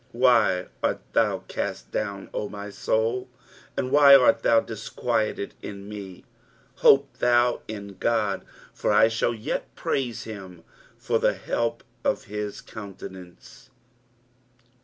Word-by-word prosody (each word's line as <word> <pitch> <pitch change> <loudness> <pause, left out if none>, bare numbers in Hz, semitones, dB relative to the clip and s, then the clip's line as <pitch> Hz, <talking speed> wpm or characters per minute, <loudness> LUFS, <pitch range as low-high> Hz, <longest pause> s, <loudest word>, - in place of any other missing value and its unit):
5 120 - -10
Why 115 -8 +4 0.2
art - - +1 0.2
thou - - +2
cast - - -4
down, 100 -2 -4
O 105 - -3
my 100 0 -7
soul? 115 +5 0 0.5
and 130 - -1
why 140 -1 +9
art 130 -2 +5
thou 115 - +5
disquieted 110 -1 -2
in 100 -1 -8
me? 100 -3 -9 0.5
hope 140 0 +4
thou 120 0 +3
in 100 -3 -7
God: 105 -5 0 0.3
for - - 0
I 110 - +6
shall 115 +1 0
yet 110 - -4
praise 125 -4 -2
him 95 -6 -9 0.3
for - - 0
the - - +2
help 115 0 -2 0.2
of - - 0
his 105 0 -5
countenance. 100 +4 -11
110 Hz, 130 wpm, -25 LUFS, 100-120 Hz, 0.5 s, why